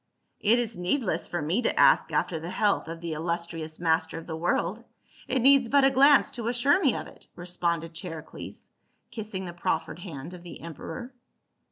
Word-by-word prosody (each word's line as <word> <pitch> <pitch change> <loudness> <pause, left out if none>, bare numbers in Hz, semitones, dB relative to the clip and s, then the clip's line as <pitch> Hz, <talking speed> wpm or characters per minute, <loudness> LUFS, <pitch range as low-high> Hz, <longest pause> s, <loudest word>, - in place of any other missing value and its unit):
" - - -48
It 225 +1 +4
is 235 -2 -1
needless 180 - -1
for 175 -3 -3
me 175 +11 +1
to - - 0
ask - - +5
after 165 - 0
the 165 +2 -6
health 205 -2 +1
of 165 0 -7
the 170 -2 -3
illustrious 165 0 -4
master 160 -1 +1
of 165 - -8
the 160 - -5
world. 175 +6 -1 0.4
It 255 -2 0
needs 270 -3 +6
but 280 +1 +5
a 270 - +5
glance 280 +2 +6
to 235 -2 -5
assure 250 +9 +3
me 270 - +3
of - - -4
it," - - -15
responded 170 -2 -2
Charicles, 165 -2 -8 0.4
kissing 210 -4 -5
the 175 - -6
proffered 165 -1 -2
hand 165 -2 -8
of 180 - -10
the 175 - -10
emperor. 235 - -7
175 Hz, 190 wpm, -27 LUFS, 165-235 Hz, 0.4 s, needs